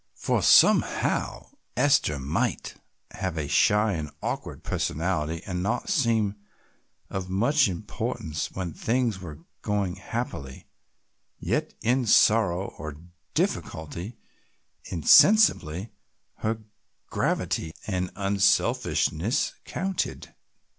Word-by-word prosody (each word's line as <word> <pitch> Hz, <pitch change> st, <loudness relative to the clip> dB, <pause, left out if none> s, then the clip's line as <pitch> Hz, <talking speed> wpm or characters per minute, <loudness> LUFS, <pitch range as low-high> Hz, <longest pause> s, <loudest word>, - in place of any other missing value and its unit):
For -, -, 0 dB
somehow -, -, +3 dB, 0.3 s
Esther 140 Hz, -, +3 dB
might 70 Hz, +2 st, -2 dB, 0.4 s
have 95 Hz, -3 st, -4 dB
a 75 Hz, -2 st, -2 dB
shy 105 Hz, +7 st, +3 dB
and 80 Hz, -3 st, -4 dB
awkward -, -, -4 dB
personality 80 Hz, 0 st, -2 dB
and 90 Hz, -2 st, -3 dB
not 115 Hz, -, -2 dB
seem 115 Hz, -, +1 dB, 0.7 s
of 95 Hz, -1 st, -4 dB
much 120 Hz, +10 st, +3 dB
importance 80 Hz, -3 st, -4 dB
when 90 Hz, -4 st, -5 dB
things 115 Hz, -2 st, 0 dB
were 80 Hz, -2 st, -10 dB, 0.2 s
going 100 Hz, -3 st, -1 dB
happily, 95 Hz, -, -5 dB, 0.7 s
yet -, -, -2 dB
in 125 Hz, +2 st, +1 dB
sorrow 100 Hz, -4 st, +4 dB
or 75 Hz, 0 st, -6 dB, 0.4 s
difficulty, 85 Hz, +8 st, -3 dB, 0.7 s
insensibly 95 Hz, -, +4 dB, 0.5 s
her 110 Hz, 0 st, -2 dB, 0.5 s
gravity 80 Hz, -, -1 dB
and 90 Hz, -3 st, -2 dB
unselfishness 100 Hz, -, +1 dB
counted. 190 Hz, -1 st, -3 dB
95 Hz, 90 wpm, -26 LUFS, 80-115 Hz, 0.7 s, sorrow